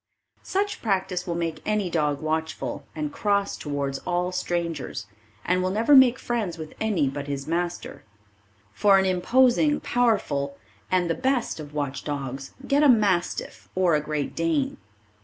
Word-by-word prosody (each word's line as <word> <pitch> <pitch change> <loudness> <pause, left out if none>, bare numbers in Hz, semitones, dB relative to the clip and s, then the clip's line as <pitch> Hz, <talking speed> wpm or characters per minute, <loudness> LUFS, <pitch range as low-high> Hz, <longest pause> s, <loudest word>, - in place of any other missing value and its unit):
Such 405 +2 -2
practice 190 -4 -1
will 170 - -1
make 165 -2 -3
any 210 -3 0
dog 150 -3 0
watchful 160 -2 -3
and 150 -2 -3
cross 200 -1 0
towards 140 -2 -3
all 180 0 -1
strangers, 170 -10 -3 0.4
and 180 +1 +2
will 185 - 0
never 225 +9 +4
make 260 -2 +7
friends 220 -10 -2
with 155 -1 -8
any 200 -10 +1
but 140 +1 -4
his 140 -1 -3
master. 175 +2 -3 0.7
For 195 - +5
an 190 - +3
imposing, 255 +10 +3
powerful 195 -13 0 0.3
and 180 -1 +2
the 165 - +1
best 260 -5 0
of 150 -1 -9
watch 140 -2 -3
dogs 135 -2 -5
get 280 +2 +3
a 295 - +6
Mastiff 205 -7 +1
or 185 -2 +3
a 150 - +3
Great 150 -1 -3
Dane. 165 -4 0
175 Hz, 155 wpm, -25 LUFS, 150-210 Hz, 0.7 s, make